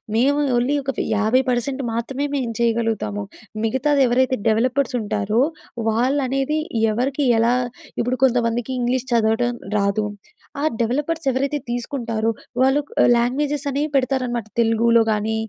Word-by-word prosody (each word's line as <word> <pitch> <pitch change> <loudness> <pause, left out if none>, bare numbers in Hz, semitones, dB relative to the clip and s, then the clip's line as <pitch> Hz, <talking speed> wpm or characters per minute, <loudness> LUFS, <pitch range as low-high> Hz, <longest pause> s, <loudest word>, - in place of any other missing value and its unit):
మేము 275 +5 +3 0.2
ఓన్లీ 255 +4 +1
ఒక 270 - -1
ఫి - - -1
50% 255 +3 +1
మాత్రమే 265 +5 -2
మేం 255 -4 -1
చేయగలుగుతాము. 225 - 0 0.4
మిగతాది 275 +5 +1
ఎవరైతే 255 +2 +2
డెవలపర్సుంటారో, 225 -3 +1 0.5
వాళ్ళనేది 270 +5 0 0.3
ఎవరికి 270 +5 0
ఎలా 235 +2 +3 0.4
ఇప్పుడు 245 +2 0
కొంతమందికి 240 0 0
ఇంగ్లీష్ 250 +1 -1
చదవటం 235 +2 +2 0.2
రాదు. 200 +1 +1 0.6
ఆ - - -2 0.2
డెవలపర్స్ 295 +7 -1
ఎవరైతే 275 +3 -1
తీసుకుంటారో, 235 -2 -2 0.3
వాళ్ళు 270 +2 +4 0.4
లాంగ్వేజెస్ 285 +4 0
అనే 280 +2 -1
పెడతారనమాట. 255 -4 0
తెలుగూలో 230 0 +4
గానీ, 215 +1 0
245 Hz, 110 wpm, -21 LUFS, 230-270 Hz, 0.6 s, వాళ్ళు